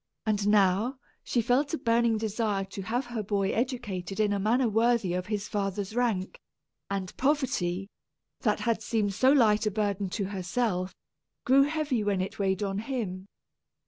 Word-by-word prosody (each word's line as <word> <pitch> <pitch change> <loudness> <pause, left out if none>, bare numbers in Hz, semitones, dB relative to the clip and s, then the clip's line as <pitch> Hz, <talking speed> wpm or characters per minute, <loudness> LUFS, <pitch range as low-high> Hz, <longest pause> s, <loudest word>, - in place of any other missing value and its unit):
And 205 -2 +1
now, 205 +5 +3 0.3
she 235 - 0
felt 280 +7 +2
a - - -5
burning 230 -2 +2
desire 215 -2 -1
to 195 - -7
have 235 +7 -2
her 240 -2 -4
boy 200 -1 0
educated 210 -6 -3
in 210 -1 +2
a 200 - 0
manner 235 +5 +2
worthy 225 -3 +2
of 180 0 -2
his 210 -1 -2
father's 200 0 -2
rank; 225 -7 -1 0.5
and 195 -2 -3
poverty, 220 -10 0 0.5
that - - 0
had 230 -2 0
seemed 210 -3 0
so 260 +7 +4
light 220 -6 +4
a - - +4
burden 200 -2 -1
to 200 +3 -2
herself, 190 -1 -2 0.5
grew 270 +2 +6
heavy 295 -6 -1
when 200 -2 0
it 185 +2 -4
weighed 190 0 0
on 195 0 -2
him. 210 -6 -4
210 Hz, 165 wpm, -28 LUFS, 195-240 Hz, 0.5 s, grew